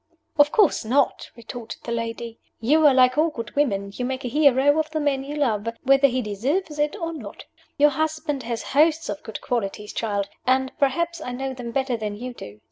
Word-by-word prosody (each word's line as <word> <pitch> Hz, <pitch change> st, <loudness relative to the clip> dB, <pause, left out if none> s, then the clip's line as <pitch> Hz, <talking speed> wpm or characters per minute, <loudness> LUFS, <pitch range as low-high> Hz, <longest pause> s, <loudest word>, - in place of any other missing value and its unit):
"Of 290 Hz, 0 st, +6 dB
course 420 Hz, -, +3 dB
not!" 260 Hz, +5 st, +1 dB
retorted 235 Hz, 0 st, -9 dB
the 235 Hz, -, -5 dB
old 235 Hz, -, 0 dB
lady. 230 Hz, 0 st, -5 dB, 0.2 s
"You 300 Hz, +7 st, +4 dB
are 280 Hz, -, +6 dB
like 255 Hz, +2 st, +5 dB
all 325 Hz, +2 st, +4 dB
good 230 Hz, -7 st, -7 dB
women 200 Hz, -9 st, 0 dB
you 250 Hz, -, -4 dB
make 260 Hz, +1 st, -3 dB
a -, -, -1 dB
hero 285 Hz, +1 st, +4 dB
of 310 Hz, 0 st, -1 dB
the 310 Hz, 0 st, -2 dB
man 280 Hz, -3 st, 0 dB
you 285 Hz, +2 st, -6 dB
love, 230 Hz, -7 st, 0 dB, 0.2 s
whether 275 Hz, +1 st, +5 dB
he 255 Hz, -1 st, -1 dB
deserve 240 Hz, -, -1 dB
it 295 Hz, +2 st, -1 dB
or 335 Hz, -5 st, -4 dB
not. 225 Hz, -11 st, -9 dB, 0.3 s
Your 295 Hz, +1 st, +5 dB
husband 310 Hz, -1 st, -2 dB
has 235 Hz, -1 st, -4 dB
hosts 315 Hz, +1 st, +2 dB
of 205 Hz, -1 st, -4 dB
good 220 Hz, -, -7 dB
qualities, 210 Hz, -3 st, -3 dB
child 205 Hz, -3 st, -1 dB, 0.2 s
and 260 Hz, 0 st, +2 dB
perhaps 335 Hz, +5 st, 0 dB
I 250 Hz, -, -5 dB
know 265 Hz, +1 st, -3 dB
them 245 Hz, -2 st, -7 dB
better 260 Hz, 0 st, -1 dB
than 210 Hz, -2 st, -4 dB
you 250 Hz, +2 st, -6 dB
do. 105 Hz, -, -11 dB
260 Hz, 210 wpm, -24 LUFS, 230-295 Hz, 0.3 s, Of